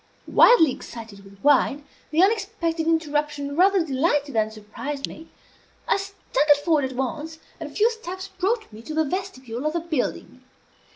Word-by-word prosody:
Wildly 375 - +6
excited 225 -5 -9
with 200 0 -16
wine, 290 0 +3 0.2
the 315 +4 +3
unexpected 380 -6 0
interruption 295 -3 0
rather 375 0 +4
delighted 290 0 0
than 215 -1 +1
surprised 220 +7 -6
me. 320 +1 -11 0.6
I - - +3
staggered 350 -7 +1
forward 310 -5 +3
at 260 -1 -5
once, 300 +5 -3 0.2
and 315 -3 -6
a - - -17
few 440 +3 +4
steps 375 -4 -7
brought 390 - -2
me 215 - -10
to 305 +6 -7
the 315 0 +2
vestibule 270 - -4
of 305 - -1
the 340 - 0
building. 310 -5 -3
305 Hz, 160 wpm, -24 LUFS, 270-365 Hz, 0.6 s, Wildly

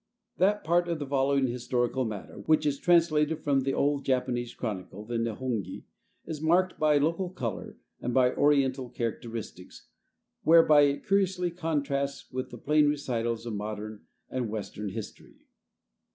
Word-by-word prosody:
That 205 +3 +2
part 175 +2 +2
of 170 -1 -1
the 145 - -4
following 135 0 +2
historical 125 +1 -1
matter, 105 -3 -7
which 155 -1 +3
is 140 -2 0
translated 160 -3 +3
from 140 -2 +2
the 135 0 -1
old 140 0 +1
Japanese 125 -2 -1
chronicle, 105 -2 -5
the 115 +1 -2
Nehongi, 115 -2 -3 0.4
is 155 -2 -6
marked 180 +4 +2
by 150 -1 +4
local 165 +5 0
color 125 - -5 0.2
and 125 - -2
by 125 0 +3
Oriental 135 -3 +2
characteristics, 115 -5 -6 0.5
whereby 160 -2 +6
it 140 0 -1
curiously 190 -3 +1
contrasts 145 -5 -2
with 130 0 -4
the - - -9
plain 150 0 +3
recitals 120 -6 -2
of 115 - -4
modern 105 0 -5 0.3
and 125 -3 -3
Western 105 -1 -5
history. 105 +2 -9
135 Hz, 145 wpm, -28 LUFS, 120-155 Hz, 0.5 s, whereby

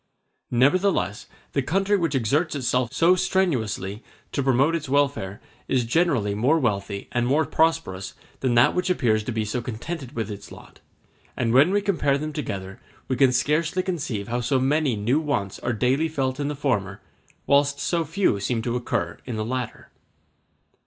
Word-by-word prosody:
Nevertheless, 140 - +2 0.3
the 140 - +2
country 195 +9 +1
which 165 -7 0
exerts 145 +7 +1
itself 125 -2 0
so 175 +2 +4
strenuously 125 - -1 0.3
to 140 - -1
promote 135 +4 +3
its 155 -5 -3
welfare 140 -8 0 0.3
is 125 -3 +1
generally 120 -7 +1
more 125 +10 +2
wealthy 100 -7 -2
and 120 0 0
more 145 +4 +2
prosperous 160 - 0 0.2
than 125 -3 +1
that 120 +1 +5
which 180 +1 -1
appears 110 -11 +2
to 120 - -4
be 110 -1 -1
so 115 +4 -2
contented 130 +4 -6
with 110 -2 -3
its 100 - -9
lot; - - -14 0.6
and 115 -1 0
when 140 +7 +6
we 205 +2 +2
compare 150 -8 +1
them 155 +1 -4
together, 95 -10 -5 0.3
we 130 - 0
can 130 +1 +4
scarcely 155 +8 +1
conceive 135 - -3
how 120 +1 -1
so 125 +3 +1
many 140 -1 +1
new 115 +8 +1
wants 140 -11 -2
are 120 - -2
daily 130 +7 +1
felt 135 -3 -2
in 145 - -1
the 150 - -3
former, 100 -9 -1 0.5
whilst 140 0 +3
so 170 +2 0
few 160 - +1
seem 115 +3 -1
to 120 0 -1
occur 125 - -2
in 120 - -3
the 110 0 -2
latter. 125 0 -5
130 Hz, 175 wpm, -24 LUFS, 115-155 Hz, 0.6 s, when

